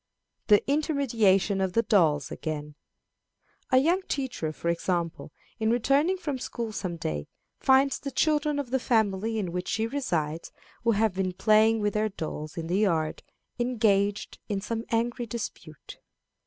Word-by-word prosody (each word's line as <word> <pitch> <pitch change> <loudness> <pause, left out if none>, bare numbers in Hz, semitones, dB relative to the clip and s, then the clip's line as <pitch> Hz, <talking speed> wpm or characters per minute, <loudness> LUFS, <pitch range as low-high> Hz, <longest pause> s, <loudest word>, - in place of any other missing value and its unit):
The 210 -2 +5
Intermediation 230 - +2
of 190 -2 0
the 230 - +3
Dolls 160 -10 +2
again. 150 -2 -5 1.0
A 255 - +4
young 335 +8 +3
teacher, 260 - -2
for 165 - -6
example, 170 -1 -2 0.3
in 220 0 +1
returning 275 +10 +2
from 290 -7 -4
school 235 -3 -4
some 185 -4 -4
day, 75 - -3 0.3
finds 265 +1 +4
the 280 - -5
children 300 +1 +1
of 275 -4 -4
the 265 - +2
family 220 -2 +1
in 190 -5 -2
which 180 +1 -4
she 220 +1 0
resides, 170 - -2 0.3
who 230 -1 +3
have 215 -1 +2
been 185 -1 -1
playing 215 +3 +4
with 205 -1 0
their 215 0 +1
dolls 155 -4 -6
in 165 - -3
the 180 +4 0
yard, 165 -7 +1 0.4
engaged 210 -4 +1
in 200 -2 -1
some 225 +3 -4
angry 235 +1 -1
dispute. 205 -8 -7
215 Hz, 155 wpm, -27 LUFS, 180-250 Hz, 1.0 s, The